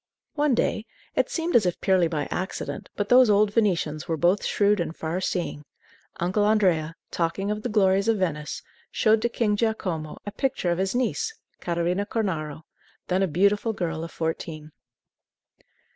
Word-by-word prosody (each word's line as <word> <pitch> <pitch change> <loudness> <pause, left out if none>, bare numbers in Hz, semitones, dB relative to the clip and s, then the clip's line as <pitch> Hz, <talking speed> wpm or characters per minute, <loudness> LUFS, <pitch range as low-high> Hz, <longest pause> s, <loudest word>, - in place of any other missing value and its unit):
One 295 -4 +2
day 220 0 0 0.3
it - - +1
seemed 335 +1 -2
as 215 -6 +5
if 175 - -2
purely 185 -3 +3
by 155 -3 -2
accident, 185 +1 -4
but 205 - -1
those 250 -1 +7
old 205 0 +4
Venetians 170 -9 0
were 165 - -1
both 175 +5 +2
shrewd 205 0 +2
and 170 -1 -2
far 165 +3 -3
seeing 175 -5 -2 0.6
Uncle 185 +4 +1
Andrea, 180 -7 +2 0.2
talking 185 +4 -1
of 210 0 -3
the 245 - -3
glories 195 -2 +3
of 225 -1 +3
Venice, 150 -6 -2 0.3
showed 220 -1 +3
to 235 - +1
King 220 -3 +1
Giacomo 185 -8 -2
a 205 - -4
picture 230 -8 -1
of 170 - -1
his 190 +4 0
niece, 445 - -1 0.2
Catarina 175 +3 -1
Cornaro, 160 -10 -2 0.5
then 185 +1 +2
a 195 - +3
beautiful 200 +7 +2
girl 165 -5 -3
of 165 - -7
fourteen. 160 -1 -4
190 Hz, 165 wpm, -25 LUFS, 165-215 Hz, 0.6 s, those